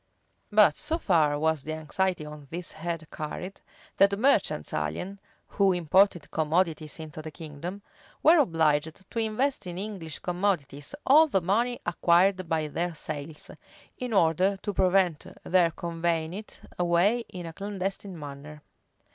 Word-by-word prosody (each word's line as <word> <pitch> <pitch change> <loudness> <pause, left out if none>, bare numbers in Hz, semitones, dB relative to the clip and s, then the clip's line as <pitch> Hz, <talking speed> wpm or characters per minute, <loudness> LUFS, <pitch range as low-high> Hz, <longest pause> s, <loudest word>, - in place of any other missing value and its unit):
8. - - -12
But 210 -1 +6
so 310 +2 0
far 160 - +2
was 160 0 +1
the 155 +3 -5
anxiety 160 +2 -1
on 150 -1 -10
this 170 +2 -5
head 165 0 -4
carried, 170 +5 -6 0.4
that 200 0 +4
merchants 210 - +2
alien, 80 - -3 0.3
who 195 -2 +3
imported 180 0 +2
commodities 160 -1 0
into 155 -1 -7
the 155 - -7
kingdom, 165 +5 -8 0.4
were 330 +1 +7
obliged 160 - +1
to 230 - -2
invest 225 0 0
in 175 0 -6
English 190 -7 -5
commodities 175 - -2
all 305 +4 +7
the 195 - +2
money 230 +7 0
acquired 175 +2 +3
by 160 -1 0
their 170 +3 -3
sales, 150 0 -7 0.4
in 250 -1 -5
order 185 +1 +3
to 205 - -2
prevent 185 -4 +2 0.2
their 175 -2 +3
conveying 165 -1 -2
it 210 +3 -8 0.2
away 175 +6 +3
in 180 -2 -7
a 165 - -7
clandestine 195 -1 -4
manner. 145 0 -9
175 Hz, 145 wpm, -27 LUFS, 155-195 Hz, 0.4 s, were